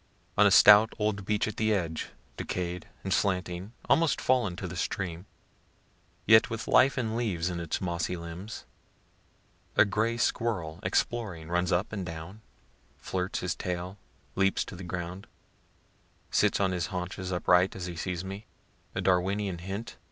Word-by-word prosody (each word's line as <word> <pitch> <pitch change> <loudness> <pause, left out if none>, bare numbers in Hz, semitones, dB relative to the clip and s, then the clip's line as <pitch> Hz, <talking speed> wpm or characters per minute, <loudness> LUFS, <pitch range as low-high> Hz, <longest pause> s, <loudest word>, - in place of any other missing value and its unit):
On - - +6
a - - +6
stout 105 +2 +8
old 105 -2 -1
beech 105 0 +1
at 110 - -5
the 110 -1 +2
edge, 85 -4 -2 0.3
decayed 90 +3 -4 0.2
and 95 - 0
slanting, 90 0 -1 0.2
almost 165 -1 +3
fallen 120 -8 +1
to 95 - -5
the 90 - -7
stream, 90 +1 -3 1.0
yet 110 0 +6
with 115 -1 -4
life 135 +2 +5
and 110 -3 -1
leaves 90 -7 -1
in 85 - -4
its 85 -2 -2
mossy 90 -1 -2
limbs, 85 +6 -8 1.1
a 105 - +6
gray 110 +3 0
squirrel, 95 -9 -1
exploring, 95 -4 -1
runs 90 0 +1
up 95 +5 0
and 100 -3 -3
down, 85 +5 -8 0.6
flirts 90 0 -3
his 90 - -1
tail, 90 +2 -4 0.3
leaps 95 0 +1
to - - -9
the 95 - -8
ground, 90 +2 -5 1.0
sits - - +3
on 95 -1 +2
his 90 -2 -1
haunches 90 0 -4
upright 90 +1 +3
as 90 - -5
he 90 -1 -5
sees 90 +1 -3
me, 100 +3 -7 0.5
(a - - -1
Darwinian 95 0 +1
hint?) 95 +6 -6
95 Hz, 155 wpm, -29 LUFS, 90-105 Hz, 1.1 s, stout